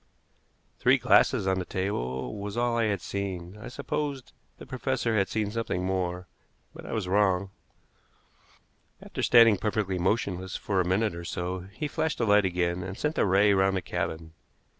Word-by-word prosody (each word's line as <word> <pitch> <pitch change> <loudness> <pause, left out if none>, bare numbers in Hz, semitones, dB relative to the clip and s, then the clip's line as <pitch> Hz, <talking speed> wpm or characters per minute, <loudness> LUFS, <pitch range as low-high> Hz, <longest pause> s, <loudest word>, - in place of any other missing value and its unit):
Three - - +5
glasses - - +4
on 95 -1 +1
the - - -2
table 65 -11 -3
was 100 +2 -5
all 120 0 +1
I 115 -1 +2
had 100 -4 -1
seen. 95 -2 -5
I 105 - -9
supposed 140 0 -4 0.2
the - - -11
professor 130 -3 -1
had 100 -2 +2
seen 105 -2 -1
something 110 -5 -2
more, 90 -1 -2 0.5
but - - -10
I - - -6
was 110 -5 -2
wrong. 95 -1 +2 1.5
After - - -6
standing 115 -4 +6
perfectly 100 -2 -1
motionless 95 -1 -1
for 95 -3 0
a 90 - -2
minute 100 +2 +1
or 85 0 -7
so, 90 +2 -4
he 150 +8 -3
flashed 155 +1 -2
the 115 - 0
light 105 -1 +4
again, 90 -1 0
and 95 +1 -6
sent 150 +1 -1
the - - +1
ray 100 +2 +4
round 95 0 +2
the - - -2
cabin. 80 0 -4
95 Hz, 175 wpm, -27 LUFS, 90-110 Hz, 1.5 s, standing